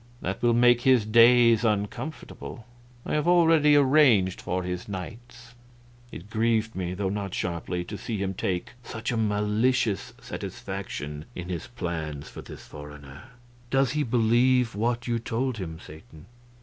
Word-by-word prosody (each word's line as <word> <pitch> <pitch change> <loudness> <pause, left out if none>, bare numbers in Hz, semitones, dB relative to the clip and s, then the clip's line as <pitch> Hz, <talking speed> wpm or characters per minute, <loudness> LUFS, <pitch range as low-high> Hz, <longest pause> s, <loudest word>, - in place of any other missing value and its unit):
That - - -4
will 120 -1 +3
make 120 0 +5
his 130 -4 +4
days 115 +1 +6
uncomfortable 110 +3 -4 0.4
I - - -3
have 150 +1 0
already 165 -4 +5
arranged 130 -10 +4
for 90 +1 -2
his 90 +2 -5
nights." 120 +5 -9 0.6
It 90 - -9
grieved 110 0 0
me, 90 -1 -3
though 95 0 -1
not 100 -2 -4
sharply, 90 0 -3
to 105 +4 -8
see 115 - -4
him 95 -1 -2
take 90 -1 -3
such 110 0 -5
a - - -1
malicious 105 +1 0
satisfaction 75 +1 -6
in 90 0 -6
his 85 -3 -4
plans 80 -10 -5
for - - -9
this - - -11
foreigner. 75 -1 -11 0.4
"Does 135 -1 +2
he 150 - 0
believe 120 0 +2
what 120 +3 -1
you 120 -1 0
told 120 +2 -2
him, 80 -4 -5
Satan?" 80 0 -14
110 Hz, 150 wpm, -26 LUFS, 90-120 Hz, 0.6 s, days